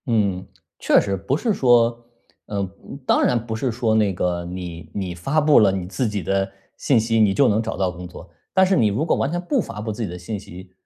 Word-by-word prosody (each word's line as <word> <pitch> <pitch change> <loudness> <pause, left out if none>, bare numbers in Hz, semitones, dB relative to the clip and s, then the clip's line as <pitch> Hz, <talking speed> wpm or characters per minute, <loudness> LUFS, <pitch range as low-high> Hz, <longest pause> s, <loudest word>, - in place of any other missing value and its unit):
嗯， 100 -6 0 0.3
确 - - +4
实， 100 -1 -1
不 100 +9 -1
是 225 +4 0
说， 120 -4 +3 0.4
呃， 100 -2 -3 0.4
当 - - +3
然 120 -2 +2
不 110 -2 -4
是 125 +2 -1
说 115 -1 0
那 105 -3 +2
个， 90 -1 -1
你 90 -2 -7
你 95 -3 -3
发 135 - 0
布 150 -1 +5
了 100 -3 +5
你 95 -2 -3
自 115 +7 -2
己 105 -3 -3
的 95 +3 0 0.3
信 130 -5 +2
息， 115 0 +1
你 105 -3 +4
就 135 +6 +4
能 110 0 +2
找 - - -4
到 95 -2 0
工 90 0 -9
作， 90 0 -12 0.3
但 190 0 +5
是 190 +1 +2
你 115 -5 +3
如 105 +10 0
果 - - +2
完 140 - -1
全 175 - -1
不 245 +8 0
发 105 - -8
布 110 +1 -3
自 105 - -6
己 105 - -3
的 90 - -7
信 100 +4 -5
息， 90 -1 -12
105 Hz, 260 characters per minute, -22 LUFS, 95-120 Hz, 0.4 s, 布